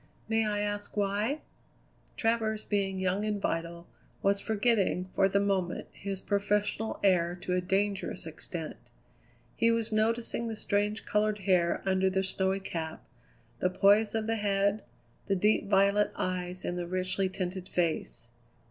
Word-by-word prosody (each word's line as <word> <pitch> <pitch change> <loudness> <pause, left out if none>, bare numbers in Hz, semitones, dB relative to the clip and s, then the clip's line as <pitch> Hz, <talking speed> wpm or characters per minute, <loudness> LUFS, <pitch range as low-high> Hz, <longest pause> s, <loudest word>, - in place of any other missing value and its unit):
"May 225 -1 +2
I 205 -1 0
ask 205 0 -4
why?" 205 +8 0 0.8
Travers, 225 -2 0
being 195 -2 0
young 190 +2 0
and 210 -1 -1
vital, 170 -1 -2 0.4
was 200 0 +3
forgetting, 215 -4 +1
for 195 - +3
the 200 - +2
moment, 190 -3 -1
his 195 -1 -5
professional 205 +2 0
air 175 -2 +3
to 180 - -1
a 180 - +2
dangerous 195 +1 -1
extent. 160 0 -6 0.8
He 230 - +3
was 230 -1 +1
noticing 230 +2 0
the 225 - -3
strange 210 0 -1
coloured 210 0 +1
hair 180 -3 +2
under 190 0 +3
the 190 0 0
snowy 190 +1 0
cap, 160 -3 -5 0.6
the 180 - +2
poise 205 +4 +4
of 220 -1 0
the 225 0 0
head, 200 0 +1 0.5
the 195 - +2
deep 210 +2 +2
violet 200 +1 +4
eyes 180 0 -3
in 175 - -2
the 175 -1 -3
richly 185 +1 0
tinted 185 0 -4
face. 165 -8 -1
200 Hz, 150 wpm, -30 LUFS, 185-210 Hz, 0.8 s, poise